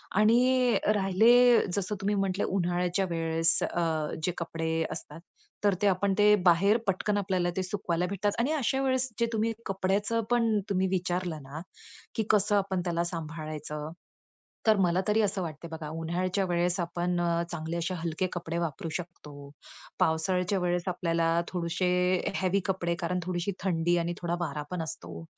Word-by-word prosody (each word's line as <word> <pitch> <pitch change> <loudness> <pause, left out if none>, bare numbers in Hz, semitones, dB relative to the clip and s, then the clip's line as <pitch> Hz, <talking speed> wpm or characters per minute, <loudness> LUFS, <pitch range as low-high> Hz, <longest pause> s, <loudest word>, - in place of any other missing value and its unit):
आणि 245 +4 +4 0.2
राहिले, 230 +5 +5 0.2
जसं 200 +1 -2
तुम्ही 205 +1 +1
म्हटले 195 0 0
उन्हाळ्याच्या 180 0 0
वेळेस 165 0 +2
अ, 160 -3 -1
जे 180 - +1
कपडे 165 -1 -2
असतात, 150 +2 -7 0.4
तर 205 -2 +4
ते 205 - +4
आपण 195 +1 +2
ते 210 0 +6
बाहेर 190 +5 +5
पटकन 205 +2 0
आपल्याला 185 -3 0
ते 190 - +1
सुकवायला 180 -3 -1
भेटतात 200 +1 0
आणि 250 +6 +1
अशा 270 -2 0
वेळेस 260 -1 +1
जे 235 - +3
तुम्ही 225 +1 +1
कपड्याचं 195 +4 0
पण 230 -3 +3
तुम्ही 190 -1 +1
विचारलं 180 -3 -2
ना, 145 +4 -8 0.5
की 220 - +1
कसं 205 0 +3
आपण 190 -2 0
त्याला 170 -1 0
सांभाळायचं? 155 -2 -5 0.8
तर 215 - +6
मला 180 -1 +2
तरी 215 +1 +3
असं 195 -2 0
वाटते 165 -1 -6
बघा, 160 -2 -6
उन्हाळ्याच्या 175 +4 -1
वेळेस 175 0 0
आपण 175 +1 -1
अ, 170 0 +1
चांगले 165 0 -4
असे 170 +2 -2
हलके 170 +1 -2
कपडे 170 -1 -4
वापरू 165 -1 -3
शकतो, 150 -5 -10 0.5
पावसाळ्याच्या 180 +4 +1
वेळेस 175 -1 0
आपल्याला 165 -2 0 0.2
थोडेसे 180 +1 -1 0.5
हेवी 190 +1 +2
कपडे, 175 -3 -1
कारण 180 +1 -1
थोडीशी 175 +2 -2
थंडी 175 -2 +1
आणि 170 0 -1
थोडा 175 0 -1
वारा 150 -3 -3
पण 180 -2 -2
असतो, 85 - -7
180 Hz, 155 wpm, -28 LUFS, 165-200 Hz, 0.8 s, ते